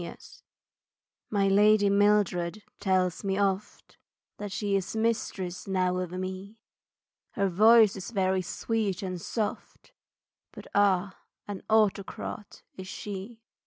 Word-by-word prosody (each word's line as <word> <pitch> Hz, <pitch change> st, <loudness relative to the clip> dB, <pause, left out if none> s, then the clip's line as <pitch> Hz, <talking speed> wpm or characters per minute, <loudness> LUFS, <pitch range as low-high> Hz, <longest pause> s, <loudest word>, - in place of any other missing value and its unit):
Mildred 170 Hz, -, -9 dB, 1.0 s
My 200 Hz, -2 st, +2 dB
lady 205 Hz, +1 st, +5 dB
Mildred 200 Hz, -2 st, +2 dB, 0.2 s
tells 185 Hz, -1 st, 0 dB
me 195 Hz, -1 st, -1 dB
oft 200 Hz, +1 st, -2 dB, 0.4 s
That 205 Hz, -1 st, -6 dB
she 205 Hz, 0 st, -1 dB
is 195 Hz, +2 st, -2 dB
mistress 200 Hz, -5 st, -2 dB
now 185 Hz, -1 st, +1 dB
of 180 Hz, -2 st, -3 dB
me, 185 Hz, +3 st, -6 dB, 0.8 s
Her 200 Hz, -, +1 dB
voice 215 Hz, +3 st, +6 dB
is 195 Hz, -1 st, -6 dB
very 190 Hz, -4 st, +1 dB
sweet 205 Hz, +1 st, -2 dB
and 185 Hz, -2 st, -4 dB
soft, 215 Hz, +2 st, -4 dB, 0.6 s
But, -, -, -10 dB
ah, 200 Hz, -1 st, +2 dB, 0.3 s
an 205 Hz, -2 st, -6 dB
autocrat 210 Hz, -1 st, -1 dB
is 185 Hz, 0 st, -8 dB
she. 205 Hz, +4 st, -7 dB
195 Hz, 120 wpm, -28 LUFS, 185-210 Hz, 1.0 s, voice